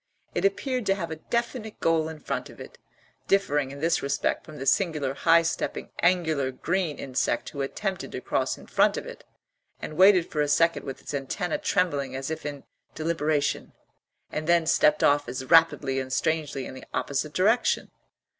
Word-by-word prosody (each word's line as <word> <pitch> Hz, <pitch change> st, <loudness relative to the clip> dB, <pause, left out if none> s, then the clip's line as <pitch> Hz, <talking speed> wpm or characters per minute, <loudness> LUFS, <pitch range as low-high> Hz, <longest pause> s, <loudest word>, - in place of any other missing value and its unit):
It -, -, 0 dB
appeared 250 Hz, +4 st, 0 dB
to 195 Hz, -, +3 dB
have 170 Hz, -4 st, -5 dB
a 160 Hz, -, -4 dB
definite 235 Hz, -, -3 dB
goal 160 Hz, -1 st, +2 dB
in 160 Hz, -, -8 dB
front -, -, -4 dB
of -, -, -14 dB
it, -, -, -11 dB, 0.5 s
differing 145 Hz, -8 st, +2 dB
in 140 Hz, +1 st, -9 dB
this 165 Hz, +1 st, +2 dB
respect 140 Hz, 0 st, -1 dB
from 155 Hz, -, -11 dB
the 135 Hz, -, -5 dB
singular 150 Hz, -3 st, +1 dB
high 165 Hz, +3 st, +4 dB
stepping 165 Hz, 0 st, -3 dB
angular 160 Hz, -7 st, +2 dB
green 165 Hz, +3 st, -1 dB
insect 130 Hz, -3 st, -1 dB
who 140 Hz, -, -5 dB
attempted 190 Hz, +7 st, -3 dB
to -, -, -3 dB
cross -, -, -1 dB
in -, -, -13 dB
front -, -, +2 dB
of -, -, -5 dB
it, -, -, -10 dB, 0.6 s
and -, -, -6 dB
waited 185 Hz, +1 st, +6 dB
for 150 Hz, -, 0 dB
a 145 Hz, -, +1 dB
second 165 Hz, +4 st, +2 dB
with 135 Hz, -, -6 dB
its -, -, -7 dB
antennæ 140 Hz, +5 st, -2 dB
trembling 145 Hz, -9 st, 0 dB
as 135 Hz, +3 st, -4 dB
if 160 Hz, -2 st, -4 dB
in 145 Hz, -1 st, -7 dB, 0.3 s
deliberation, 155 Hz, -2 st, -1 dB, 0.6 s
and 155 Hz, +1 st, -4 dB
then 170 Hz, -1 st, +4 dB
stepped 150 Hz, -1 st, +3 dB
off 145 Hz, -2 st, +3 dB
as 130 Hz, +1 st, -5 dB
rapidly 150 Hz, -3 st, +4 dB
and 130 Hz, 0 st, -5 dB
strangely 150 Hz, -2 st, -1 dB
in -, -, -8 dB
the 130 Hz, -, -10 dB
opposite 140 Hz, +2 st, -2 dB
direction. 220 Hz, +6 st, +2 dB
155 Hz, 185 wpm, -26 LUFS, 140-175 Hz, 0.6 s, waited